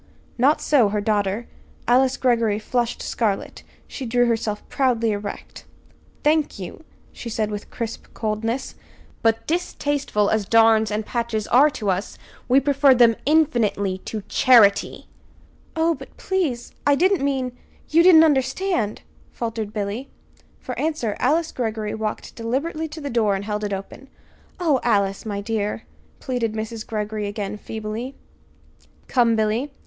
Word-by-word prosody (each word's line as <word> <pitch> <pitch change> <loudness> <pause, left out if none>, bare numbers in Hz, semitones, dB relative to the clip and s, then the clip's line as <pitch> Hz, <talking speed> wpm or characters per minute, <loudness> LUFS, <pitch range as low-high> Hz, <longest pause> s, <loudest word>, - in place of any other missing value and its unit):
Not 280 +5 +4
so 255 -8 +4
her 210 +1 -1
daughter. 205 +1 0 0.4
Alice 255 +2 +3
Greggory 230 -5 +2
flushed 240 +2 -2
scarlet. 210 -4 -2 0.3
She 270 - -7
drew 245 +1 +3
herself 225 -3 -2
proudly 235 -4 +1
erect. 205 0 -6 0.6
"Thank 305 -3 +2
you," 195 - -8 0.3
she 235 - -8
said 215 -1 -1
with 205 0 -6
crisp 230 -2 -6
coldness; 225 +3 -2 0.5
"but, 225 0 +1
distasteful 290 - -1
as 215 -3 0
darns 225 -1 +5
and 210 0 -2
patches 230 -3 -2
are 280 +5 +6
to 205 -4 0
us, 185 +2 -3 0.3
we 255 +2 +5
prefer 275 -1 +4
them, 235 -2 +5
infinitely, 235 -11 +2
to 215 -2 -5
charity!" 215 -6 +4 0.7
"Oh, 325 +1 +2
but, - - -12
please, 335 -11 -2
I 290 0 +4
didn't 370 +1 +2
mean 260 -3 -1 0.3
you 325 +2 +4
didn't 335 -2 +8
understand," 270 - 0 0.3
faltered 225 -3 -4
Billy. 210 +5 -4 0.5
For - - -6
answer 300 -9 -1
Alice 310 +5 +1
Greggory 220 -3 -3
walked 220 -1 -4
deliberately 280 +8 -2
to 315 +1 -9
the 285 - -4
door 220 -4 +2
and 195 +1 -4
held 210 0 -3
it 205 - -2
open. 195 +7 -6 0.5
"Oh, 310 -7 +2
Alice, 200 -2 0
my 200 -1 -3
dear," 210 -1 -2 0.4
pleaded 245 -4 -2
Mrs. 220 +1 -5
Greggory 210 -1 -3
again, 205 0 -4
feebly. 220 +5 -6 0.9
"Come, 235 -3 +3
Billy! 220 +6 0
230 Hz, 140 wpm, -22 LUFS, 210-270 Hz, 0.9 s, didn't